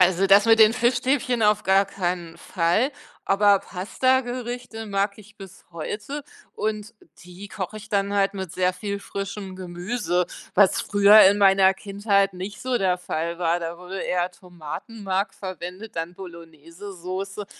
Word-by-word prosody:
Also, 185 +1 +4
das 200 +2 +6
mit 225 0 +5
den 220 0 +8
Fischstäbchen 245 +1 +1
auf 210 0 +3
gar 195 +1 +4
keinen 175 -3 -4
Fall, 185 - 0 0.3
aber 200 0 +4
Pastagerichte 245 +3 -2
mag 200 0 -1
ich 210 0 -16
bis 190 -2 -13
heute 210 - -5 0.3
und 215 0 -3 0.3
die 180 +3 -11
koche 215 0 -6
ich 215 - -13
dann 200 -1 0
halt 200 -1 +2
mit 190 -4 -6
sehr 185 0 +1
viel 200 +2 -5
frischem 195 -1 -6
Gemüse, 180 0 -2 0.3
was 195 -1 +4
früher 205 +1 +6
in 195 +2 +6
meiner 195 -1 +5
Kindheit 200 0 0
nicht 190 +2 -7
so 255 -1 0
der 185 -2 +1
Fall 170 -1 -4
war. 170 0 +1
Da 170 0 -5
wurde 180 +2 -8
eher 180 0 -1
Tomatenmark 190 +3 -5
verwendet, 185 +2 -8
dann 165 +2 -4
Bolognesesoße 180 +3 -8
195 Hz, 145 wpm, -24 LUFS, 180-210 Hz, 0.3 s, den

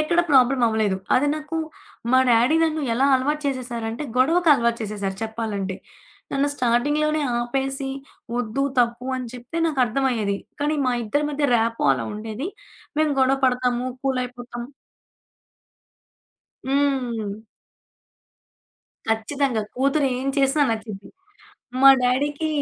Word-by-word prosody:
ఎక్కడ 340 +3 +2
ప్రాబ్లమ్ 260 -1 +4
అవ్వలేదు. 220 -3 +1 0.2
అదే 270 +3 +3
నాకు 310 +1 -5 0.6
మా 260 - +6
డ్యాడీ 240 +7 +4
నన్ను 315 -1 -1
ఎలా 265 +4 +3
అలవాటు 295 +4 0
చేసేశారంటే 240 -2 -3
గొడవకలవాటు 270 -5 +3
చేసేశారు 200 -2 -4
చెప్పాలంటే. 215 -4 -3 0.6
నన్ను 280 +1 +1
స్టార్టింగ్‌లోనే 290 +5 +1 0.2
ఆపేసి 270 +3 -2 0.5
ఒద్దు 245 +3 -1 0.2
తప్పు 240 +1 +1
అని 255 -1 -5
చెప్తే 250 +6 -6
నాకర్థమయ్యేది. 250 -7 0 0.2
కానీ, 295 +1 +1
మా 250 - +2
ఇద్దరి 260 +7 0
మధ్య 290 0 -1
ర్యాపో 230 0 0
అలా 125 -3 -2
ఉండేది. 220 +6 -5 0.5
మేము 310 -1 +2
గొడవ 265 +1 +4
పడతాము 250 -1 +1 0.2
కూలయిపోతాం. 250 -2 -3 2.0
హ్మ్. 255 -6 0 1.7
ఖచ్చితంగా! 225 +2 0
కూతురేం 270 -1 +1
చేసినా 275 +2 +3
నచ్చిద్ది. 215 -3 -5 0.7
మా 275 - +9
డ్యాడీకి 285 +5 0
255 Hz, 105 wpm, -23 LUFS, 230-280 Hz, 2.0 s, మా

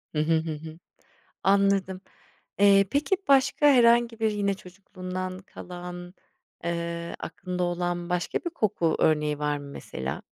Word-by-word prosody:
Hı - - +1
hı. 155 +2 +2
Hı 160 0 -2
hı. 160 +1 -10 0.6
Anladım. 195 -1 +2 0.6
Eee, 200 0 +6
peki 295 +7 +1
başka 275 +2 +4
herhangi 235 -3 +5
bir, 220 - +2
yine 200 -1 0
çocukluğundan 185 -1 -7
kalan, 180 -1 -9 0.5
eee, 170 0 -3
aklında 180 0 -5
olan 175 0 -2
başka 180 0 -1
bir 345 - -5
koku 205 - 0
örneği 150 -1 +2
var 150 0 -1
mı 145 - -10
mesela? 65 - -6
180 Hz, 135 wpm, -26 LUFS, 170-200 Hz, 0.6 s, Eee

